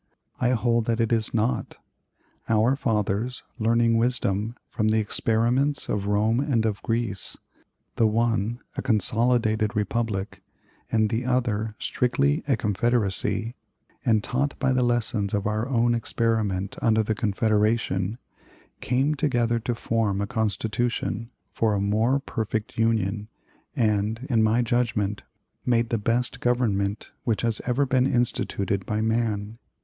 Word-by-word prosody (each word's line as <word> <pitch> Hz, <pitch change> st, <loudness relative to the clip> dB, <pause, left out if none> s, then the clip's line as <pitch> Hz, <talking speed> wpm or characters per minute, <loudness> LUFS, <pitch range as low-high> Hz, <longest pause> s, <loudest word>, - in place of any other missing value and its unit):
I 125 Hz, -, +2 dB
hold 115 Hz, -1 st, +1 dB
that 115 Hz, 0 st, 0 dB
it 115 Hz, 0 st, +2 dB
is 110 Hz, -2 st, 0 dB
not. 115 Hz, +2 st, -1 dB, 0.7 s
Our 115 Hz, +4 st, +3 dB
fathers, 110 Hz, -1 st, -1 dB, 0.2 s
learning 115 Hz, +1 st, +3 dB
wisdom 115 Hz, -2 st, 0 dB
from 110 Hz, -, -1 dB
the 110 Hz, +1 st, +3 dB
experiments 120 Hz, +6 st, +1 dB
of 100 Hz, -1 st, -1 dB
Rome 105 Hz, +3 st, +2 dB
and 130 Hz, -6 st, +1 dB
of 105 Hz, -3 st, -1 dB
Greece 115 Hz, -4 st, -2 dB, 0.6 s
the 115 Hz, -, +4 dB
one 115 Hz, +1 st, 0 dB
a -, -, -2 dB
consolidated 110 Hz, -2 st, +2 dB
republic, 105 Hz, -1 st, -2 dB, 0.5 s
and 110 Hz, -1 st, +2 dB
the 115 Hz, +2 st, 0 dB
other 110 Hz, -4 st, 0 dB
strictly 70 Hz, -, +1 dB
a 135 Hz, -5 st, +2 dB
confederacy 105 Hz, +1 st, 0 dB, 0.5 s
and 110 Hz, -3 st, +2 dB
taught 140 Hz, +3 st, -1 dB
by 130 Hz, -1 st, +1 dB
the 130 Hz, -, +2 dB
lessons 115 Hz, -4 st, 0 dB
of 100 Hz, +1 st, -1 dB
our 110 Hz, +3 st, -1 dB
own 120 Hz, -2 st, +2 dB
experiment 110 Hz, -4 st, -1 dB
under 110 Hz, -1 st, +3 dB
the 110 Hz, -, 0 dB
Confederation, 105 Hz, -1 st, +1 dB, 0.6 s
came 135 Hz, +4 st, +1 dB
together 120 Hz, -6 st, +1 dB
to 120 Hz, +1 st, -2 dB
form 115 Hz, -4 st, 0 dB
a 100 Hz, -, 0 dB
Constitution 115 Hz, +1 st, -2 dB, 0.2 s
for 110 Hz, -2 st, +1 dB
'a -, -, 0 dB
more 110 Hz, +7 st, +2 dB
perfect 110 Hz, -5 st, -3 dB
union,' 110 Hz, -2 st, 0 dB, 0.5 s
and, 110 Hz, +2 st, 0 dB
in 115 Hz, -2 st, +4 dB
my 110 Hz, +3 st, +3 dB
judgment, 110 Hz, -4 st, 0 dB, 0.4 s
made 120 Hz, -2 st, +1 dB
the 115 Hz, -, 0 dB
best 120 Hz, +4 st, 0 dB
government 105 Hz, -5 st, 0 dB
which 115 Hz, -2 st, 0 dB
has 115 Hz, -2 st, 0 dB
ever 130 Hz, +3 st, +2 dB
been 130 Hz, 0 st, +2 dB
instituted 100 Hz, -5 st, 0 dB
by 105 Hz, -, -1 dB
man. 110 Hz, -1 st, -1 dB
115 Hz, 135 wpm, -25 LUFS, 105-120 Hz, 0.7 s, the